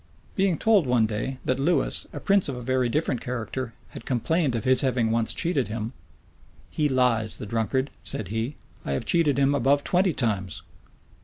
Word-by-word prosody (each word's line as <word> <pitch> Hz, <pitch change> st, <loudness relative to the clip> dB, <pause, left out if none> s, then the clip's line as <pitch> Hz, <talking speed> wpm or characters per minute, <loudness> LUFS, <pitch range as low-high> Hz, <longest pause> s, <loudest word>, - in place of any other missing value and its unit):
Being 190 Hz, -4 st, +1 dB
told 210 Hz, -9 st, +3 dB
one 120 Hz, -3 st, +3 dB
day, 110 Hz, +5 st, -3 dB
that 130 Hz, +1 st, 0 dB
Lewis, 165 Hz, +6 st, +1 dB
a -, -, -6 dB
prince 200 Hz, -5 st, +2 dB
of 130 Hz, -, -4 dB
a -, -, -6 dB
very 130 Hz, 0 st, +1 dB
different 140 Hz, -2 st, -1 dB
character, 125 Hz, 0 st, -4 dB
had -, -, -10 dB
complained 135 Hz, +2 st, 0 dB
of 115 Hz, -, -2 dB
his 130 Hz, 0 st, +4 dB
having 125 Hz, -4 st, +1 dB
once 115 Hz, 0 st, +2 dB
cheated 165 Hz, -7 st, 0 dB
him: 110 Hz, +2 st, -4 dB, 0.8 s
"He 150 Hz, -1 st, 0 dB
lies, 125 Hz, -4 st, +2 dB
the -, -, -6 dB
drunkard!" 115 Hz, +5 st, -1 dB
said 105 Hz, -, -2 dB
he; 115 Hz, +6 st, -3 dB, 0.3 s
"I 70 Hz, -, -3 dB
have 70 Hz, -, -2 dB
cheated 160 Hz, -5 st, +2 dB
him 140 Hz, 0 st, +3 dB
above 140 Hz, +1 st, +2 dB
twenty 185 Hz, +1 st, +2 dB
times." 100 Hz, -, -2 dB
130 Hz, 180 wpm, -25 LUFS, 115-145 Hz, 0.8 s, his